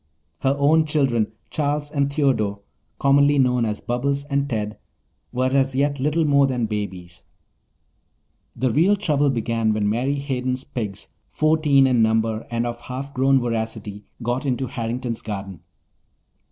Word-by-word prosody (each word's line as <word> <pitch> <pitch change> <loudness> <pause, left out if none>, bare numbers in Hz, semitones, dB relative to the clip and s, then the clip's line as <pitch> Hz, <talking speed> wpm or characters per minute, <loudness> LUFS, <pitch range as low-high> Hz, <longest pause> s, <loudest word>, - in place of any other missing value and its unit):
Her 135 +1 +1
own 155 +3 +4
children, 135 -8 +1 0.2
Charles 145 0 -1
and 140 -2 0
Theodore, 115 -9 0 0.4
commonly 140 +1 +4
known 125 -3 +3
as 105 -1 -3
Bobbles 140 +3 -1
and 140 0 0
Ted, 105 -3 -3 0.5
were 130 +1 0
as 135 -1 +2
yet 140 +1 +1
little 150 +4 +1
more 140 -2 +4
than 125 -3 -1
babies. 95 -5 -5 1.3
The 130 -2 0
real 170 - +4
trouble 150 -8 +1
began 115 -3 0
when 105 -1 0
Mary 125 +7 0
Hayden's 130 -2 -2
pigs, 105 -8 -5 0.2
fourteen 155 -3 +3
in 125 -3 +3
number 110 0 +1
and 115 0 -1
of 120 0 -5
half 135 +3 -6
grown 135 +1 +3
voracity, 110 -3 -4 0.2
got 120 +2 -1
into 130 -1 -1
Harrington's 120 -1 -4
garden. 100 -4 -6
130 Hz, 140 wpm, -22 LUFS, 115-140 Hz, 1.3 s, own